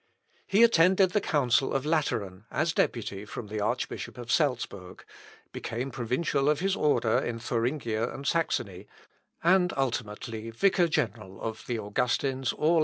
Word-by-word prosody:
He 205 +4 +5
attended 185 -3 +5
the 210 - +1
council 135 - +2
of 135 +1 0
Lateran, 110 - -1
as 160 +2 0
deputy 105 -8 -1
from 105 0 -7
the 105 0 -3
Archbishop 105 - -3
of 120 -1 -5
Salzbourg, 120 - -1 0.5
became 125 +4 -4
provincial 135 +4 0
of 150 -1 +2
his 195 +2 +1
order 145 - +2
in 120 -1 -3
Thuringia 115 -1 -1
and 140 - -8
Saxony, 105 - -1 0.6
and 180 +1 +4
ultimately 115 -3 -3
vicar 175 - +3
general 110 - -2
of 110 -1 -6
the 120 - -1
Augustins 125 +4 0
all - - -9
over - - +5
Germany. 165 - +4
125 Hz, 150 wpm, -28 LUFS, 110-155 Hz, 0.6 s, He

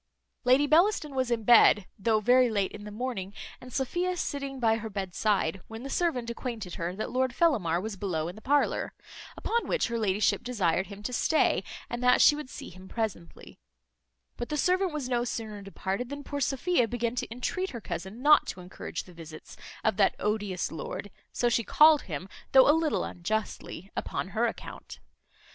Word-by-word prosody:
Lady 260 +3 +5
Bellaston 315 -1 +3
was 260 -2 0
in 235 -2 0
bed, 215 -3 +6
though 220 +2 +2
very 250 +3 +4
late 200 -3 0
in 210 0 -9
the 210 - -7
morning, 205 -4 -4 0.3
and 250 - -11
Sophia 350 +8 -1
sitting 275 -4 -3
by 225 -2 +3
her 225 0 -6
bed 195 -3 -4
side, 195 -4 0
when 225 +2 -8
the 275 - -6
servant 315 -9 0
acquainted 230 -6 -5
her 170 +2 -3
that 215 - -4
Lord 255 0 0
Fellamar 205 - +2
was 215 +2 -5
below 170 -5 -2
in 175 - -6
the 215 - -12
parlour; 285 +3 +1 0.4
upon 470 +1 -1
which - - 0
her 235 0 -2
ladyship 210 -1 +1
desired 190 -7 0
him 205 0 -10
to 250 - -4
stay, 315 +6 +2 0.2
and 240 +1 -5
that 250 0 +5
she 295 - +7
would 300 -3 -7
see - - -8
him 185 +1 -13
presently; 210 -6 -5 0.8
but 240 - -5
the 300 - -1
servant 365 +4 +2
was 300 -4 -3
no 240 -1 +1
sooner 220 -3 -5
departed 195 +4 -4
than 285 0 -6
poor 285 +1 -4
Sophia 270 0 +1
began 235 0 -2
to 245 - -3
intreat 250 - -3
her 235 - -6
cousin 200 +3 -6
not 300 +1 +6
to - - -5
encourage 180 0 -6
the 180 - -15
visits 160 -2 -11 0.3
of - - +1
that 200 - +3
odious 205 -3 -1
lord 165 +5 -6 0.2
(so 240 - 0
she 235 -1 +2
called 305 +6 +6
him, 165 0 -6 0.3
though 265 -1 +8
a 295 - +7
little 320 -1 +1
unjustly) 195 0 -4
upon 185 - -3
her 225 +4 +1
account. 225 - -8
230 Hz, 190 wpm, -28 LUFS, 195-265 Hz, 0.8 s, though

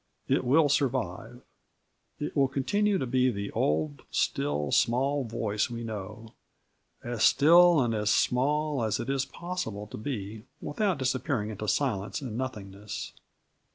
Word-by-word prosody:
It - - +2
will 145 +5 +4
survive. 125 -4 -1 0.8
It 150 - -4
will 140 -2 +4
continue 205 +10 +1
to 150 - -2
be 130 +1 +2
the 100 -3 -4
old 75 -1 0
still, 75 +1 -1
small 135 +3 +2
voice 110 -1 -1
we 120 0 -5
know 110 +1 -7 0.7
as 120 -2 -4
still 170 +5 +6
and 120 -3 +1
as 105 -1 0
small 145 +4 +1
as 110 -2 0
it 135 - -2
is 135 -1 0
possible 170 - -5
to 105 - -9
be 110 -3 -5 0.2
without 190 +3 -1
disappearing 130 -4 -1
into 105 0 -6
silence 105 -6 0
and 125 -6 -6
nothingness. 105 -5 -6
120 Hz, 140 wpm, -28 LUFS, 105-140 Hz, 0.8 s, still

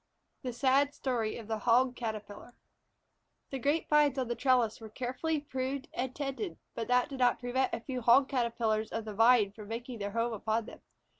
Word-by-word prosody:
THE 255 - -3
SAD 275 +3 +2
STORY 235 -5 -1
OF 225 -3 -9
THE 220 -1 -2
HOG 245 +3 +3
CATERPILLAR 215 0 -6 1.0
THE 270 - -3
grape 290 +6 +1
vines 295 -2 +4
on 255 -2 0
the - - +1
trellis 235 -3 +2
were 220 - -8
carefully 260 +7 -2
pruned 270 +1 -4
and 255 0 -3
tended, 285 +6 -4 0.2
but 230 - -4
that 250 0 +3
did 270 -2 -7
not 245 -1 +3
prevent 255 +1 0
a - - -3
few 255 +1 -4
Hog 245 +4 +6
Caterpillars 230 -4 0
of 225 -1 -3
the 215 - -5
Vine 225 -1 +5
from 210 0 -11
making 235 +1 -6
their 200 0 -2
home 230 +1 0
upon 220 +1 -1
them. - - -12
245 Hz, 195 wpm, -31 LUFS, 225-265 Hz, 1.0 s, Hog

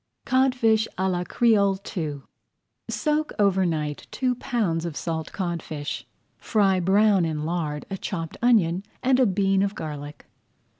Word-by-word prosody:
CODFISH 250 -4 +3
À 190 +1 +1
LA 175 0 -1
CREOLE 200 -5 +3 0.2
II 150 -5 -3 0.7
Soak 305 0 0
over 190 -2 +3
night 150 -3 -3
two 255 -1 0
pounds 215 -10 -1
of 165 -4 -4
salt 160 -2 -3
codfish. 170 -5 -4 0.3
Fry 195 -4 +2
brown 195 +1 +4
in 155 -2 -2
lard 155 -3 -2
a 195 - -3
chopped 165 -5 -4
onion 195 -7 +3 0.2
and 260 0 +3
a 255 - +5
bean 195 0 +2
of 200 +1 0
garlic. 145 -1 -7
190 Hz, 140 wpm, -25 LUFS, 165-220 Hz, 0.7 s, a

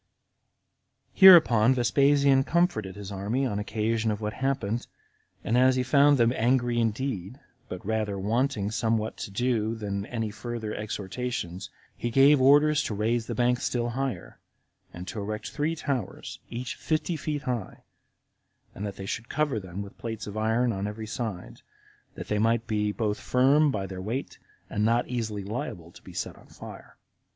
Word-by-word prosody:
30. - - -22
Hereupon 130 - +8
Vespasian 135 +2 +4
comforted 150 - 0
his 100 -1 -8
army 105 +8 -1
on 105 -5 -2
occasion 110 +2 -1
of 105 -1 -2
what 105 -1 -3
happened, 130 -4 -2 0.6
and 115 - 0
as 130 +1 +5
he 130 - +1
found 140 +3 +5
them 120 0 +3
angry 120 0 +1
indeed, 115 -1 -2 0.3
but 90 +1 -7
rather 110 -2 -1
wanting 105 0 0
somewhat 110 -1 0
to - - -5
do 115 +1 0
than 100 -2 -4
any 115 -3 -3
further 110 -1 -5
exhortations, 105 -2 -4 0.3
he 120 - -3
gave 135 +3 +5
orders 145 +2 +5
to 105 - -3
raise 115 +2 0
the - - -3
banks 125 0 +1
still 120 -1 -1
higher, 130 +2 -4 0.5
and 90 +2 -9
to 105 - -5
erect 105 +1 -5
three 155 +2 -1
towers, 135 - -4
each 120 +1 -4
fifty 160 +2 -1
feet 150 -1 -3
high, 125 -8 -4 0.9
and 105 +2 -5
that 100 - -6
they 95 - -7
should 115 +4 -5
cover 150 -7 0
them 95 +1 -6
with 100 - -13
plates 110 -2 -5
of 105 - -7
iron 110 +2 +1
on 100 +1 -3
every 105 +1 -6
side, 110 -5 -5 0.5
that - - -7
they 105 - 0
might 115 +1 +2
be 105 -2 0
both 105 -1 -2
firm 140 +4 +3
by 100 -7 -2
their 95 -1 -7
weight, 120 +8 -4 0.3
and 105 - -2
not 115 +2 +2
easily 110 -5 -3
liable 100 -5 -5
to - - -16
be - - -12
set - - -4
on - - -18
fire. - - -12
115 Hz, 170 wpm, -27 LUFS, 105-130 Hz, 0.9 s, Hereupon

